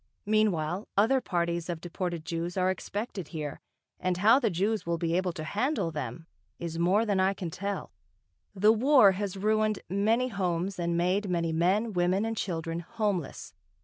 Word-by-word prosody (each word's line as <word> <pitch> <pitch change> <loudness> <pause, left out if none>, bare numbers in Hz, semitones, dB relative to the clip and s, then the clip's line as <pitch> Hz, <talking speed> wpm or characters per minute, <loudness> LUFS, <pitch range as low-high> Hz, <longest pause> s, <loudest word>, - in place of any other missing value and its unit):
Meanwhile, 200 -4 +1
other 250 +6 +4
parties 170 -3 -1
of 170 -2 -3
deported 175 -1 -4
Jews 170 +2 -3
are 185 0 +3
expected 200 -2 -5
here, 150 -4 -5 0.4
and 185 -1 0
how 220 +7 +6
the 235 -5 +1
Jews 200 +4 0
will 170 0 -1
be 165 0 -1
able 185 0 +1
to 160 -3 -6
handle 210 - -1
them, 150 0 -5 0.3
is 165 -1 -5
more 190 +6 +3
than 200 -3 +1
I 190 +1 +2
can 175 -4 -5
tell. 200 +3 -4 0.6
The 210 +3 +5
War 250 -2 +6
has 195 0 -3
ruined 215 +1 +1
many 225 +6 +2
homes 185 -2 -2
and 170 0 0
made 185 +4 +1
many 170 -2 0
men, 195 +7 +1
women, 180 +3 +1
and 225 0 -2
children 165 -4 -3
homeless. 190 -2 -3
185 Hz, 170 wpm, -29 LUFS, 170-210 Hz, 0.6 s, how